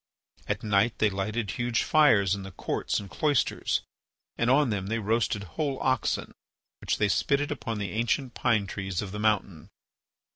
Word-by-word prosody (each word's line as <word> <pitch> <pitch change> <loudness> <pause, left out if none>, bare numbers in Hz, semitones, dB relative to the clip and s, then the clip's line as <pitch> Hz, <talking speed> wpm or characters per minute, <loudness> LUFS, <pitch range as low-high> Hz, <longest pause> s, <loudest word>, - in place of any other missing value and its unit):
At 105 +1 -2
night 105 +2 +2
they 105 -2 +2
lighted 105 +2 -2
huge 120 -1 0
fires 110 -12 +4
in 100 - -3
the 95 - -7
courts - - -2
and 100 - -8
cloisters 145 +4 0 0.5
and 120 - +1
on 135 -1 +4
them 95 -2 -2
they 115 +2 -1
roasted 110 -1 0
whole 135 - -3
oxen 130 -3 0 0.5
which - - -1
they 105 - +2
spitted 140 +7 +1
upon 115 -5 -3
the 100 -3 -3
ancient 120 +4 -1
pine 115 -5 +1
trees 95 -1 -3
of 95 - -7
the 105 - -5
mountain. 100 -6 0
110 Hz, 170 wpm, -27 LUFS, 100-120 Hz, 0.5 s, fires